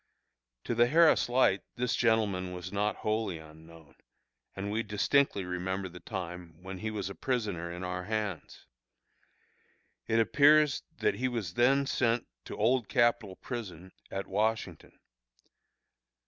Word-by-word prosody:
To - - -2
the 120 +1 +4
Harris 160 -1 +4
Light 120 -6 +3
this 125 0 0
gentleman 105 -6 +1
was 90 +2 -7
not 105 +1 0
wholly 110 -5 0
unknown, 80 0 -15 0.6
and 100 +1 -4
we 110 +2 0
distinctly 105 0 +1
remember 95 +1 -3
the 90 +1 -11
time 90 -5 -7
when 95 0 -7
he 110 - -3
was 105 -3 -3
a 100 - -5
prisoner 100 -11 -2
in 90 +1 -6
our 90 0 -4
hands. 105 -5 -4 1.4
It 115 - +2
appears 145 +5 +5 0.2
that - - +1
he 130 - -1
was 115 -8 -3
then 135 +5 +3
sent 120 -3 +1 0.2
to - - -7
Old 120 +1 +2
Capitol 120 -6 +2
Prison 95 -8 -7 0.2
at 95 - -4
Washington. 105 -4 -2
105 Hz, 135 wpm, -30 LUFS, 90-120 Hz, 1.4 s, appears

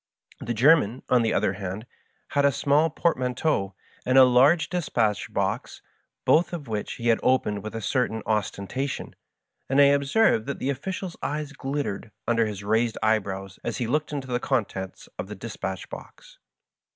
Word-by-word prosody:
The 120 - -3
German, 130 -2 +4
on 125 -1 +4
the 115 - +1
other 95 - +1
hand, 95 +2 -5 0.4
had 145 - +1
a 140 - +5
small 145 +4 +2
portmanteau 125 - 0 0.3
and 130 +1 +2
a 130 - +10
large 130 +7 +5
dispatch 120 - -1
box, - - -2 0.4
both 170 +3 +3
of 155 -6 -5
which 105 -2 -3
he 120 0 +1
opened 115 -3 +1
with 110 +2 -7
a 115 - -3
certain 110 -3 0
ostentation, 110 +5 -2 0.5
and 135 +1 +3
I - - +9
observed 140 - +2
that 140 - -3
the 135 - -1
official's 185 +6 -5
« - - -42
eyes 150 0 -3
glittered 135 -8 -3 0.2
under 115 -1 +2
his 100 -2 -6
raised 110 +2 +1
eyebrows 95 -3 -1
as - - -3
he 120 - -1
looked 150 +6 -1
into 140 -3 -4
the 120 0 0
contents 100 -8 -3
of - - -4
the 105 - -7
dispatch 95 -2 -5
box. - - -12
125 Hz, 165 wpm, -25 LUFS, 105-140 Hz, 0.5 s, a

